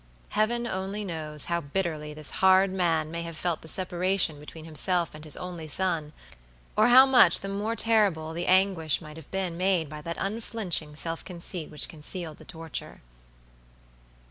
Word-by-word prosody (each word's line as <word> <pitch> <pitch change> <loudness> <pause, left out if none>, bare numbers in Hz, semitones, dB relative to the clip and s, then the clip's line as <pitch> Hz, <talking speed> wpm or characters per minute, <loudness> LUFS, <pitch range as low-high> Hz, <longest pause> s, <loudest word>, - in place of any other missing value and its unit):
Heaven 235 +3 0
only 200 0 -3
knows 155 -4 -3
how 170 0 -1
bitterly 155 -1 -3
this 150 -1 +1
hard 190 0 +5
man 165 -4 0
may 170 0 -4
have 165 -1 -6
felt 170 -2 -1
the - - -12
separation 180 -2 +1
between 155 +2 -11
himself 170 +2 0
and 155 0 -11
his 155 -2 -1
only 175 -3 -6
son, 160 -2 0 0.6
or - - +5
how 255 +2 +9
much 255 -10 +6
the 195 - -5
more 205 +3 -2
terrible 200 -9 +2
the 170 +2 -3
anguish 185 -5 +3
might 155 -2 -11
have 160 - -12
been 185 -3 -3
made 180 -4 +1
by 150 0 -8
that 170 +2 -5
unflinching 195 -7 -2
self 165 +2 -3
conceit 175 -2 -4
which 150 -2 -1
concealed 160 0 -6
the - - -14
torture. 165 -2 -6
170 Hz, 170 wpm, -27 LUFS, 155-190 Hz, 0.6 s, how